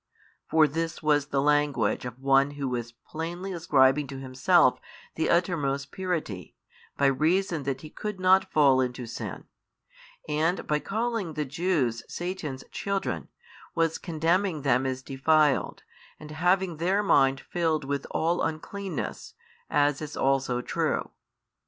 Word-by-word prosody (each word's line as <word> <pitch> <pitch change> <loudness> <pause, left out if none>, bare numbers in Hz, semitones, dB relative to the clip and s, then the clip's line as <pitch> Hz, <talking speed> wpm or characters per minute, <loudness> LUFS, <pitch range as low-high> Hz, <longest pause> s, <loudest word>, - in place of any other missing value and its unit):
for 160 -1 +5
this 165 +3 -3
was 145 -2 +2
the 140 -2 0
language 145 -3 +1
of 125 -1 -6
one 135 +1 +3
who 140 -1 -2
was 120 -2 -3
plainly 170 +9 -6
ascribing 145 -4 +3
to 135 0 -7
Himself 130 -1 +3 0.3
the 160 - -1
uttermost 145 -6 0
purity, 165 - -4 0.4
by 140 - +2
reason 160 +5 +2
that 135 -1 -2
He 155 - -10
could 210 -3 -5
not 185 +1 +4
fall 140 -4 +5
into 125 -1 -3
sin, 115 - -6 0.8
and 160 +4 0
by 150 0 +1
calling 225 -4 -2
the 150 -1 -1
Jews 140 -6 0
Satan's 170 -7 -5
children 200 -1 -2 0.5
was 165 -1 +1
condemning 165 0 0
them 130 -1 +2
as 130 0 -3
defiled 145 +2 +2 0.4
and 150 0 -10
having 180 +2 +1
their 190 +5 +1
mind 135 -7 +4
filled 160 -1 -1
with 140 0 -3
all 170 +2 0
uncleanness, 190 +5 -4 0.3
as 145 0 +2
is 150 -1 -6
also 135 -2 +1
true. - - -1
150 Hz, 135 wpm, -27 LUFS, 135-175 Hz, 0.8 s, for